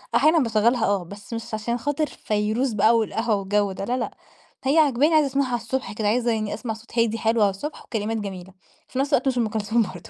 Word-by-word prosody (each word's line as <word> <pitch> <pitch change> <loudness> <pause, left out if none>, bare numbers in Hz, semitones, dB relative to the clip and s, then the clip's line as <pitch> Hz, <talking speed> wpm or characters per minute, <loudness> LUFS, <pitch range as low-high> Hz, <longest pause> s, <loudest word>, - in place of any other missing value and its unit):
أحيانًا 315 +2 +5
باشغلها 230 -1 +2
آه 200 -2 +1
بس 200 +5 -10
مش 230 0 -6
عشان 215 +3 -1
خاطر 290 +5 -1
فيروز 215 +4 -1
بقى 220 +3 +4
والقهوة 225 0 0
والجو 200 0 0
ده 195 +1 -5
لا 245 +4 -1
لأ، - - -4 0.5
هي 275 +4 +2
عاجباني 295 0 +4
عايزة 305 -2 +5
أسمعها 275 0 0
على 245 - -1
الصبح 235 -2 -3
كده 210 0 -1
عايزة 235 +2 +2
يعني 215 -2 -1
أسمع 230 -3 -4
صوت 230 +2 -6
هادي 230 -1 +2
حلو 225 0 +1
على 205 - +5
الصبح 195 +11 -6
وكلمات 225 0 -2
جميلة، 190 -3 -6 0.4
وفي 260 - -4
نفس 280 +2 0
الوقت 265 - +3
مش 260 -2 +1
أم 235 -2 +2
كلثوم 220 +2 +1
برضه 185 -4 -5
225 Hz, 225 wpm, -24 LUFS, 210-250 Hz, 0.5 s, أحيانًا